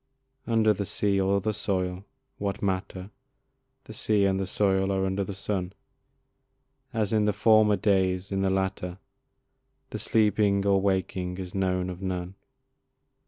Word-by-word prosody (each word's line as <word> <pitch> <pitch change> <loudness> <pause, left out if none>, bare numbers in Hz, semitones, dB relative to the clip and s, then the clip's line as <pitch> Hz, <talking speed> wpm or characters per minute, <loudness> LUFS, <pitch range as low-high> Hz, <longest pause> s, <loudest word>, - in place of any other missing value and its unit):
Under 110 -2 +3
the 100 -1 -4
sea 100 -1 +1
or 100 +1 +2
the 110 +1 -1
soil 95 -2 -2 0.3
(what 100 0 -3
matter? 95 0 -3 0.7
The - - -11
sea 105 -2 +1
and 95 -1 +1
the 95 - -2
soil 95 0 +1
are 95 0 0
under 95 +1 -1
the 95 0 -6
sun), 95 -2 -3 1.2
As 110 -2 -1
in 105 -1 +3
the 105 - +3
former 110 0 +4
days 95 -2 +1
in 95 0 0
the 95 - +2
latter, 95 -1 -2 0.9
The - - -4
sleeping 105 -2 +2
or 100 -1 +3
waking 95 -2 -1
is 95 -1 -7
known 90 -2 0
of 90 +1 -9
none. 90 -1 -3
95 Hz, 150 wpm, -27 LUFS, 95-100 Hz, 1.2 s, former